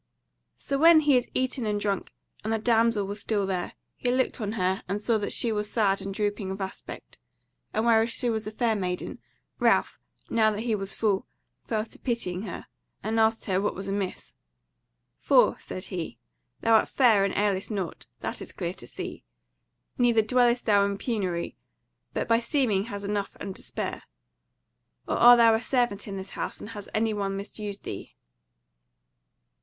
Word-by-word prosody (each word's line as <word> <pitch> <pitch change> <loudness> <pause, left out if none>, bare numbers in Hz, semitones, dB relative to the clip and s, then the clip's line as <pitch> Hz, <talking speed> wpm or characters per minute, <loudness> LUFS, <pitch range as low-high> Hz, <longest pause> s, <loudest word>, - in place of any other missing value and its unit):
So 275 -1 -2
when 325 0 +8
he 295 -2 +4
had 250 -2 +3
eaten 255 -2 0
and 210 -1 0
drunk, 200 -2 -2 0.3
and 220 - -2
the 225 - +2
damsel 225 -2 +2
was 205 +1 -5
still 205 -2 0
there, 185 -2 -2 0.2
he 250 - -2
looked 255 -1 0
on 210 0 -2
her 190 -2 0
and 200 +3 -1
saw 220 +1 +1
that 205 - -2
she 235 - +2
was 210 -1 -2
sad 200 -4 +2
and 195 - -4
drooping 205 0 -2
of 190 +1 -4
aspect; 190 -1 -7 0.5
and 220 +2 0
whereas 225 0 +4
she 245 - 0
was 220 -2 -1
a - - -4
fair 225 0 +1
maiden, 180 -3 -3 0.4
Ralph, - - +2 0.3
now 220 -1 +3
that 210 0 -3
he 230 -1 0
was 195 -2 -1
full, 205 -3 0 0.4
fell 215 -1 -1
to - - -16
pitying 215 -5 -2
her, 170 - -6 0.4
and 220 +2 0
asked 220 0 +2
her 190 -1 +1
what 210 - -1
was 195 +1 -6
amiss. 195 -1 -3 0.9
"For," - - +4
said 185 - -6
he, 170 - -5 0.4
"thou 230 - +3
art - - 0
fair 230 -7 +4
and 200 - 0
ailest 200 -1 +1
nought; 195 -7 -4
that - - -4
is - - -7
clear - - -3
to - - -12
see; - - -7 0.8
neither 235 -3 +4
dwellest 245 +2 +3
thou 205 -2 +5
in 200 0 -1
penury, 190 - -2 0.6
but - - -1
by 230 0 +4
seeming 235 -6 +1
hast 205 -3 -6
enough 200 -1 -2
and 195 -2 -5
to - - -5
spare. - - -4 1.1
Or - - 0
art 240 +1 +9
thou 230 -1 +6
a 220 - +1
servant 240 -6 0
in 195 -1 -5
this 190 0 -6
house, - - -4
and - - -8
hath 205 -3 -8
any 220 0 +2
one 195 -1 -2
misused 205 0 -6
thee?" - - -7
210 Hz, 185 wpm, -27 LUFS, 195-230 Hz, 1.1 s, art